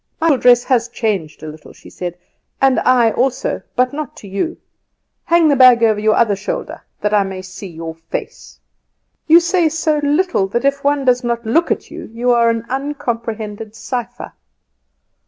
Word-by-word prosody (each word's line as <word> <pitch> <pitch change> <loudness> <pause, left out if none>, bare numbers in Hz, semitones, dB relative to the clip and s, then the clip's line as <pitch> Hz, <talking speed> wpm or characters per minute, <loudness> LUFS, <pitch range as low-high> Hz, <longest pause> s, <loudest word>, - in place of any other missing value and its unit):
"My 325 -3 +3
dress 245 -1 +4
has 245 -3 +1
changed 200 -12 -3
a - - -6
little," 155 0 -11
she - - -16
said, 175 -1 -6 0.4
"and 270 -1 +3
I 245 -3 +3
also; 255 +2 -1
but 255 +2 +1
not 305 +1 -6
to 210 - -11
you. 200 - -3 0.7
Hang 340 -1 +4
the 290 - +3
bag 250 -3 +6
over 215 -2 +3
your 215 0 +2
other 215 -4 +2
shoulder, 195 +1 -5 0.2
that 210 0 -1
I 205 - +4
may 190 -1 -5
see 190 +1 -9
your 165 -1 -7
face. 165 0 -8 0.7
You 325 +2 +8
say 345 -1 +1
so 310 -1 0
little 295 - +1
that 235 +7 -2
if 280 0 0
one 285 -1 +1
does 250 0 +2
not 235 -1 -2
look 325 +10 +1
at - - -3
you - - -8
you 240 +2 0
are 235 -1 +4
an 230 0 -2
uncomprehended 230 -6 -4
cipher." 245 -3 -6
240 Hz, 175 wpm, -17 LUFS, 210-280 Hz, 0.7 s, You